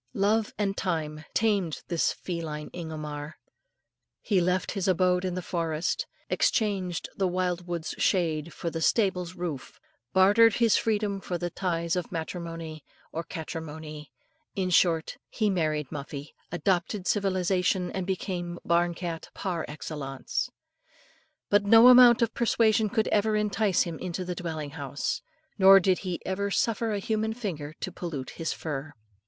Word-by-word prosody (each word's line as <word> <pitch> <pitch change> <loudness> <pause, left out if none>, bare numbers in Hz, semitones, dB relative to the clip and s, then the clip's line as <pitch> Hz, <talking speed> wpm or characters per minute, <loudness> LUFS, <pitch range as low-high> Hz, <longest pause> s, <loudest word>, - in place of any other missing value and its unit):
Love 210 +2 +2
and 200 -2 0
time 155 -5 -2
tamed 200 -8 +1
this 170 -2 +1
feline 160 -4 -5
Ingomar. 155 -2 -6 0.8
He 195 -3 +1
left 180 +1 +1
his 195 -3 -2
abode 180 0 +3
in 185 -1 -2
the 185 - -3
forest, 165 -2 -1 0.2
exchanged 190 -6 0
the 195 - +2
wild 180 -1 -1
wood's 170 -2 -3
shade 165 -4 +1
for 170 - -4
the 165 - -4
stable's 185 -2 +1
roof, 155 -7 -5 0.3
bartered 205 +4 +6
his 230 -2 +4
freedom 210 -3 0
for 180 - -3
the 175 0 -3
ties 170 -2 -1
of 180 -2 -3
matrimony, 165 -2 -5 0.3
or 165 - -3
catrimony, 155 -3 -7 0.5
in 185 -2 -1
short, 165 -2 +3
he 215 -3 +1
married 155 -5 -1
Muffie, 145 0 -7 0.2
adopted 180 +2 0
civilisation, 185 -2 +1
and 190 -1 -3
became 175 -2 -3
barn 170 0 +2
cat 170 -2 -5
par 175 -4 -2
excellence. 145 - -4 1.0
But 205 0 +5
no 225 +4 +8
amount 245 -1 +8
of 225 - 0
persuasion 220 -2 +3
could 220 +2 +1
ever 215 +1 +2
entice 210 -2 +2
him 170 -3 -6
into 180 0 -4
the 180 - -2
dwelling 160 -4 -5
house, 140 -2 -3 0.4
nor 195 0 +9
did 185 -1 +2
he 180 -3 -3
ever 200 +2 -1
suffer 225 +2 0
a 205 - 0
human 220 +2 -1
finger 155 -10 -5
to 185 - -3
pollute 165 -7 -5
his 165 -1 -3
fur. 150 -1 -5
180 Hz, 145 wpm, -28 LUFS, 160-200 Hz, 1.0 s, nor